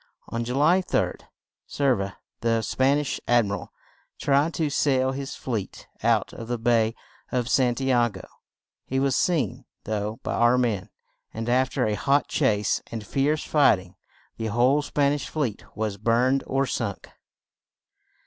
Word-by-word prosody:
On 115 Hz, 0 st, -2 dB
Ju 125 Hz, +2 st, -3 dB
ly 160 Hz, +7 st, +4 dB
3d -, -, -1 dB, 0.5 s
Cer 140 Hz, -2 st, +2 dB
ve 100 Hz, -, -2 dB
ra, 100 Hz, -, -7 dB, 0.3 s
the 115 Hz, -1 st, +1 dB
Span 135 Hz, +5 st, +2 dB
ish 150 Hz, -2 st, -2 dB
Ad 120 Hz, -2 st, +4 dB
mi 100 Hz, -, -4 dB
ral, 100 Hz, -, -5 dB, 0.5 s
tried 145 Hz, +3 st, +2 dB
to 160 Hz, -3 st, 0 dB
sail 130 Hz, -2 st, +2 dB
his 135 Hz, +1 st, -5 dB
fleet 110 Hz, -7 st, -5 dB
out -, -, +1 dB
of 115 Hz, -, -8 dB
the 120 Hz, 0 st, -1 dB
bay 115 Hz, -1 st, +2 dB, 0.4 s
of 125 Hz, -2 st, 0 dB
San 125 Hz, -2 st, +2 dB
ti 135 Hz, +1 st, 0 dB
a 120 Hz, -1 st, +4 dB
go; -, -, -10 dB, 0.6 s
he 130 Hz, -, -2 dB
was 135 Hz, -1 st, +1 dB
seen, 155 Hz, -, 0 dB, 0.2 s
though, 105 Hz, +1 st, -3 dB
by -, -, -2 dB
our 120 Hz, +1 st, +4 dB
men, 110 Hz, -5 st, 0 dB, 0.5 s
and 115 Hz, +1 st, -4 dB
af 125 Hz, +1 st, +2 dB
ter -, -, 0 dB
a 105 Hz, -, 0 dB
hot 140 Hz, +6 st, +2 dB
chase 105 Hz, -1 st, +1 dB
and 110 Hz, -2 st, -5 dB
fierce 145 Hz, +6 st, 0 dB
fight 145 Hz, -9 st, +4 dB
ing, 90 Hz, 0 st, -13 dB, 0.4 s
the 110 Hz, -, -3 dB
whole 125 Hz, +6 st, +3 dB
Span 145 Hz, -1 st, +1 dB
ish 145 Hz, -, -4 dB
fleet 135 Hz, -9 st, -2 dB
was 105 Hz, -2 st, -2 dB
burned 120 Hz, +5 st, +2 dB
or 135 Hz, +1 st, +1 dB
sunk. -, -, -3 dB
125 Hz, 175 wpm, -25 LUFS, 110-140 Hz, 0.6 s, ly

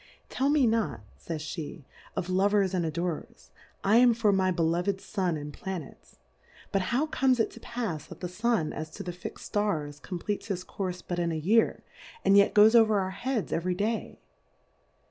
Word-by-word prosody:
Tell 270 Hz, +2 st, 0 dB
me 290 Hz, -3 st, +4 dB
not, 220 Hz, -, 0 dB
fays 155 Hz, -2 st, -5 dB
fie, 160 Hz, -3 st, -7 dB, 0.3 s
of 175 Hz, -, -2 dB
Lovers 195 Hz, +1 st, +2 dB
and 180 Hz, -2 st, +1 dB
Adorers, 165 Hz, -, -4 dB, 0.3 s
I 210 Hz, +3 st, +5 dB
am 240 Hz, -1 st, +6 dB
for 220 Hz, -3 st, +3 dB
my 190 Hz, -1 st, +2 dB
beloved 175 Hz, +3 st, +1 dB
^tm 185 Hz, -5 st, -2 dB
and 145 Hz, 0 st, -7 dB
Planets, 185 Hz, -5 st, -8 dB, 0.5 s
But 195 Hz, -, +2 dB
how 260 Hz, +6 st, +2 dB
comes 265 Hz, -5 st, +2 dB
it 225 Hz, -, +1 dB
to -, -, -12 dB
pafs 220 Hz, -11 st, -4 dB
that 175 Hz, -, -11 dB
the 180 Hz, -, -3 dB
Sun 185 Hz, -3 st, 0 dB
as 155 Hz, 0 st, -5 dB
to -, -, -8 dB
the 175 Hz, -, -4 dB
fixM 180 Hz, -, -8 dB
Stars, 155 Hz, -9 st, -2 dB
compleats 190 Hz, +5 st, -4 dB
his 185 Hz, -4 st, -3 dB
Courfe 185 Hz, -2 st, -5 dB
but 175 Hz, -1 st, -2 dB
in 170 Hz, -1 st, 0 dB
a 160 Hz, -, -2 dB
Year, 210 Hz, +9 st, +2 dB, 0.4 s
and 195 Hz, -, +6 dB
yet 200 Hz, 0 st, +5 dB
goes 215 Hz, +2 st, +7 dB
over 220 Hz, -3 st, +5 dB
our 190 Hz, -1 st, -2 dB
Heads 230 Hz, +3 st, -2 dB
every 180 Hz, +2 st, 0 dB
Day? 215 Hz, +4 st, -2 dB
190 Hz, 185 wpm, -28 LUFS, 170-215 Hz, 0.5 s, goes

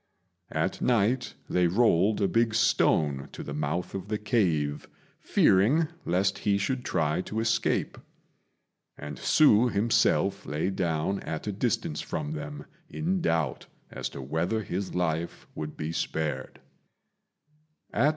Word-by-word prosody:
At 80 Hz, +4 st, -1 dB
night 120 Hz, +1 st, +1 dB
they 90 Hz, -1 st, +2 dB
rolled 100 Hz, +1 st, +3 dB
a -, -, +4 dB
big 115 Hz, 0 st, +1 dB
stone 70 Hz, -10 st, +2 dB
to -, -, -7 dB
the 70 Hz, -, -6 dB
mouth 75 Hz, +4 st, -2 dB
of 95 Hz, 0 st, -5 dB
the 105 Hz, 0 st, -1 dB
cave, 85 Hz, -10 st, 0 dB, 0.3 s
fearing 135 Hz, -, +3 dB, 0.2 s
lest 95 Hz, +2 st, +1 dB
he 100 Hz, -1 st, +2 dB
should 125 Hz, +5 st, -1 dB
try 80 Hz, -4 st, 0 dB
to 105 Hz, +4 st, -4 dB
escape; 115 Hz, 0 st, 0 dB, 1.0 s
and 75 Hz, 0 st, -7 dB
Hsü 125 Hz, -6 st, +5 dB
himself 100 Hz, -2 st, +2 dB
lay 75 Hz, +6 st, -1 dB
down 85 Hz, +1 st, -1 dB
at 80 Hz, -1 st, -5 dB
a 105 Hz, -, -1 dB
distance 125 Hz, -, -1 dB
from 150 Hz, 0 st, -4 dB
them 150 Hz, -1 st, -6 dB, 0.2 s
in 180 Hz, +4 st, -1 dB
doubt 80 Hz, -, 0 dB, 0.2 s
as -, -, -4 dB
to 70 Hz, -, -8 dB
whether 85 Hz, +11 st, -1 dB
his 95 Hz, 0 st, -4 dB
life 85 Hz, -1 st, -2 dB
would 75 Hz, 0 st, -6 dB
be 75 Hz, +1 st, -3 dB
spared. 75 Hz, -5 st, -3 dB
95 Hz, 130 wpm, -28 LUFS, 80-115 Hz, 1.0 s, Hsü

